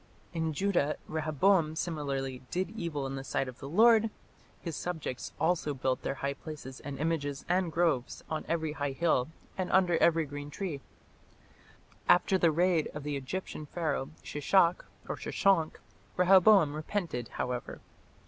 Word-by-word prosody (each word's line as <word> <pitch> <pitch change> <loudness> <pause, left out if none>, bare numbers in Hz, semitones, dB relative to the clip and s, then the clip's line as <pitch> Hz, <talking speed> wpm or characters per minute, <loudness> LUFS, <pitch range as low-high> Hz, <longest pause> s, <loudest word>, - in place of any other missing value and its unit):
" - - -31
In 160 -1 -1
Judah 155 -2 +1
Rehoboam 155 +2 +2
similarly 140 -6 -3
"did 185 +3 -2
evil 170 -10 -3
in 135 - -4
the 135 0 -5
sight 135 - -1
of 130 0 -9
the 135 - -7
Lord"; 225 +5 +5 0.5
his 165 -3 -5
subjects 160 -8 -4
"also 160 -3 +1
built 130 0 -1
them - - -2
high 140 +2 -2
places 140 -3 -9
and 140 -1 -6
images 145 -2 -2
and 180 -1 +1
groves, 160 -7 0
on 155 - -3
every 160 -2 -1
high 145 -2 -2
hill, 135 -4 +2 0.3
and 185 - -1
under 180 -3 +4
every 165 -1 +4
green 145 0 -7
tree". 155 -3 -4 1.3
After 185 +1 +5
the 170 - +5
raid 170 0 +2
of 150 - -5
the 145 0 -2
Egyptian 150 +3 -5
Pharaoh 150 -5 -2
Shishak 170 +4 +2 0.2
(Sheshonk) 190 -6 +1 0.4
Rehoboam 185 -3 +6
repented, 155 - -3
however. 125 -1 -3
155 Hz, 150 wpm, -30 LUFS, 140-175 Hz, 1.3 s, Rehoboam